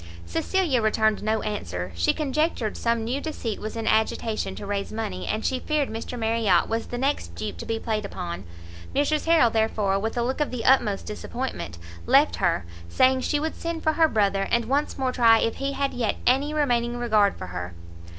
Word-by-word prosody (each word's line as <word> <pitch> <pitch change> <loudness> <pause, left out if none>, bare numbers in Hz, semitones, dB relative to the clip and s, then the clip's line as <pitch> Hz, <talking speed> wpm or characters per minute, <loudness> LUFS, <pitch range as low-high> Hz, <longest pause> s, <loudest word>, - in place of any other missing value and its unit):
Cecilia 275 - 0
returned 220 0 +2
no 220 +1 0
answer; 90 - -4
she 85 0 +2
conjectured 300 -6 -1
some 230 -1 0
new 250 +5 -2
deceit 255 -9 -4
was 215 +1 -5
in 225 -1 -3
agitation 220 0 0
to - - -7
raise 200 0 -3
money, 90 - -4
and 215 - -2
she 260 - 0
feared 300 -1 0
Mr 225 +3 -5
Marriot 220 -5 +2
was 225 +1 -2
the 245 - -5
next 260 - -1
dupe 100 0 -5
to - - -8
be 225 - -1
played 220 -1 -2
upon. 90 - -5 0.5
Mrs 300 +2 +1
Harrel, 320 -9 +5
therefore, 215 -3 +1
with 225 +3 -3
a 240 - +2
look 260 +5 -1
of 295 - +1
the 245 -3 -5
utmost 225 -7 +3
disappointment, 225 - -5 0.3
left 285 +3 +4
her, 170 - +1 0.2
saying 260 - +3
she 295 +3 0
would 315 +2 -2
send 335 -1 -4
for 315 - +2
her 320 0 +4
brother, 200 -6 +1
and 235 -1 +2
once 280 +5 0
more 260 -2 0
try 230 -2 +5
if 230 - 0
he 275 0 -2
had 275 0 -1
yet 235 -3 0
any 275 +4 +3
remaining 245 -5 +1
regard 215 -4 +2
for - - -6
her. 90 0 -5
230 Hz, 200 wpm, -25 LUFS, 210-270 Hz, 0.5 s, Harrel